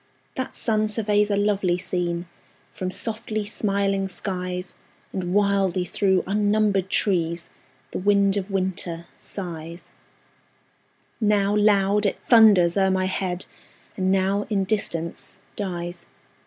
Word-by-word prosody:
That 260 - -4
sun 215 -2 +2
surveys 210 -1 +1
a 200 - +1
lovely 200 -3 +1
scene 175 -1 -2 0.5
From 185 - -4
softly 215 +2 -2
smiling 195 -2 0
skies; 180 -1 -4 0.4
And 180 -2 -3
wildly 195 -2 +2
through 190 0 +1
unnumbered 205 -1 +1
trees 170 -5 0 0.4
The - - -3
wind 200 0 +3
of 200 0 -3
winter 185 -3 -2
sighs: 170 -3 -7 1.3
Now 205 -2 +2
loud, 205 0 +3
it - - -2
thunders 205 -7 +6
o'er 190 -1 +3
my 190 0 +1
head, 185 -1 -2 0.5
And 185 -1 0
now 195 +2 +1
in 200 -3 +1
distance 170 -5 -3 0.2
dies. 175 -3 -5
195 Hz, 115 wpm, -24 LUFS, 180-205 Hz, 1.3 s, thunders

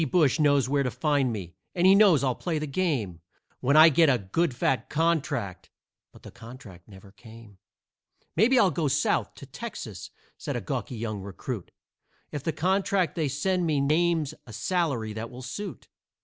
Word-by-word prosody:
Brush 160 -3 +3
knows 145 -3 +3
where 140 +1 +1
to 130 - 0
find 145 -3 0
me, 95 -6 -6 0.2
and 175 0 +2
he 190 - +8
knows 195 -8 +5
I'll 130 -2 +1
play 165 +5 -3
the 155 - -2
game 135 - -2 0.4
When 140 +4 +2
I 160 +1 +9
get 160 +1 +4
a 130 - +3
good 125 - -1
fat 130 +1 0
contract" 150 - -1 0.4
but - - -18
the - - -11
contract 115 -7 -13
never 95 -1 -15
came. 110 -2 -15 0.8
"Maybe 255 +5 +4
I'll 200 -6 +4
go 155 0 -1
South 140 +2 0
to - - -11
Texas," - - -8 0.3
said - - -4
a - - -1
gawky 125 - -4
young 110 -3 -4
recruit, 95 -2 -6 0.6
"If 145 - -4
the 160 - 0
contract 185 +1 0
that 165 - -3
they 155 - +1
send 175 +6 0
me 150 -3 +1
names 155 +1 +1
a 110 - -10
salary 125 - -1
that 110 +2 -6
will 125 +1 -10
suit. 200 +11 -7
140 Hz, 180 wpm, -26 LUFS, 115-170 Hz, 0.8 s, I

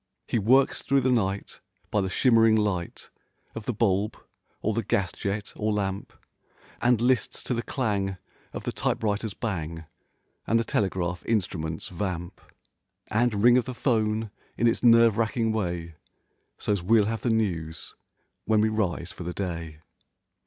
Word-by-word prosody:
He 115 - +1
works 130 +6 +3
through 135 0 +2
the 130 0 +2
night, 100 -5 -1 0.3
by 105 - +2
the 95 - -1
shimmering 115 0 +4
light 100 -5 -2 0.4
Of 115 -2 -7
the 125 - -1
bulb 105 -1 +1 0.4
or 110 - -1
the 115 - 0
gas 95 -3 0
jet 100 +1 -4
or 110 0 -1
lamp; 100 -2 -2 0.7
And 120 -1 +3
lists 125 0 +1
to - - -1
the 120 - -1
clang 100 -7 -1 0.3
of - - -6
the - - -2
typewriter's 105 -1 -1
bang, 80 -7 -4 0.6
And 115 - +3
the 115 - +2
telegraph 90 -5 -1
instrument's 85 -7 -2
vamp; 90 -2 -4 0.7
And 110 -2 +1
ring 120 +1 +7
of 125 - -3
the 130 -1 -6
'phone 110 -4 0 0.3
in 120 - +1
its 115 - +1
nerve 115 -2 +6
racking 115 0 +1
way, 85 -6 -2 0.6
So's 100 -3 -1
we'll 105 +3 +4
have 110 +1 -2
the 125 - 0
news 85 -8 -2 0.5
when 110 -1 +3
we 110 +1 +3
rise 90 -5 -1
for - - -11
the 90 +1 -4
day. 85 -5 -5
105 Hz, 155 wpm, -26 LUFS, 95-115 Hz, 0.7 s, ring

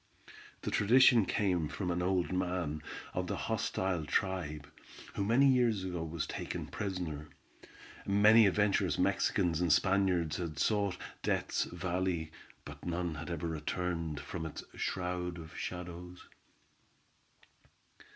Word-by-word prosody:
The - - -3
tradition 115 -1 +6
came 90 -7 +1
from 90 +3 -3
an 90 +1 -1
old 90 0 +1
man 90 -4 -1 0.3
of - - -2
the - - -2
hostile 90 -4 -1
tribe 75 -4 -1 0.5
who 100 - -1
many 120 +7 +4
years 120 -7 +3
ago 90 -3 -3
was 80 -1 -3
taken - - -4
prisoner. 85 -7 -4 0.8
Many 105 +2 +7
adventurous 100 +1 +2
Mexicans 85 -1 +1
and 85 -2 +2
Spaniards 90 -3 +2
had 85 -4 -4
sought 100 +2 +1 0.2
Death's - - 0
Valley, 90 -2 -2 0.3
but - - -10
none 85 -1 -2
had 80 +2 -6
ever 85 -1 -3
returned 80 0 -2
from 80 -2 -5
its 75 - -7
shroud 90 -1 -2
of 80 -1 -10
shadows. 90 0 -7
90 Hz, 120 wpm, -33 LUFS, 80-95 Hz, 0.8 s, Many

